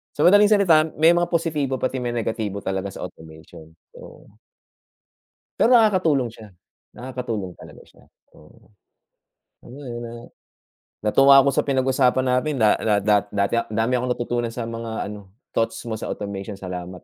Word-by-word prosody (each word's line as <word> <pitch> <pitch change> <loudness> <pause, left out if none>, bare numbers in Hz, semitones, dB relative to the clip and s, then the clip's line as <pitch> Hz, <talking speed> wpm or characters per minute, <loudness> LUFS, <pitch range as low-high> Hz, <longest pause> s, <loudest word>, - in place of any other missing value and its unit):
So 145 - 0
madaling 205 +3 +6
salita, 165 -7 +4
may 160 +2 +5
mga 175 0 +1
positibo 155 -6 -1
pati 130 0 -2
may 120 -1 -3
negatibo 110 -3 -3
talaga 95 0 -3
sa - - -8
automation 80 0 -12 0.2
so. - - -15 1.3
Pero 245 +1 +6
nakakatulong 165 - +2
siya, 110 -2 -13 0.5
nakakatulong 120 -7 -5
talaga - - -14
siya, - - -23 0.3
oo. - - -21 0.9
Alam - - -15
mo 145 - -11
iyon 120 -3 -6
na - - -9 1.0
natuwa 135 +5 +6
ako 140 0 +3
sa - - +2
pinag-usapan 130 -1 +1
natin 125 +4 0
da 110 -3 +4
da 110 - +2
da 105 +1 +3
dati 100 +2 -1
a 115 - +2
dami 115 +3 0
akong 125 0 -1
natutunan 120 -1 -2
sa 115 0 -5
mga 115 -2 -5
ano, 100 -2 -10 0.2
thoughts 115 - -1
mo 115 - -3
sa 110 - -6
automation, 100 0 -6
salamat. 90 -2 -6
120 Hz, 160 wpm, -22 LUFS, 105-140 Hz, 1.3 s, madaling